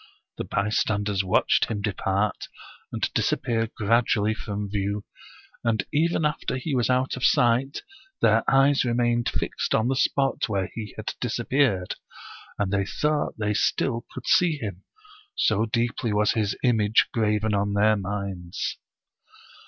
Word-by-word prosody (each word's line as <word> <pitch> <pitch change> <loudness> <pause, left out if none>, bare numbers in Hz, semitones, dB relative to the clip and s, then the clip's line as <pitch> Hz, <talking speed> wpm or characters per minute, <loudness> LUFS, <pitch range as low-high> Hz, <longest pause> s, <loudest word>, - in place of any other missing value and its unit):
The - - -2
bystanders 100 -1 0
watched 95 - +3
him 105 -3 -4
depart, 100 0 -1 0.4
and - - -1
disappear 115 -2 0
gradu 115 +3 +3
ally 105 +1 +1
from 105 -1 -5
view, 100 +1 -2 0.6
and 110 -4 0
even 160 +1 +2
after 150 -3 -1
he 140 +3 -3
was 125 -2 +1
out 130 +1 +1
of 125 - -7
sight 125 +1 +2 0.4
their 115 0 +4
eyes 135 +1 +4
remained 120 -1 +1
fixed - - -2
on 110 +3 +1
the 135 - +1
spot 135 -1 +1
where 95 -3 -1
he 105 -3 -7
had - - -4
disappeared, 120 -10 0 0.6
and 100 -1 -1
they 100 -1 +2
thought 150 +4 -1
they 105 -1 0
still 115 +2 0
could - - -8
see 170 -4 +3
him, 100 -7 -6 0.5
so 110 +1 +2
deeply 115 0 -1
was 105 0 +2
his 105 -3 -1
image 110 -4 +3
graven 105 -1 +1
on 100 0 0
their 105 +2 +4
minds. 100 -3 -4
110 Hz, 145 wpm, -25 LUFS, 100-125 Hz, 0.6 s, their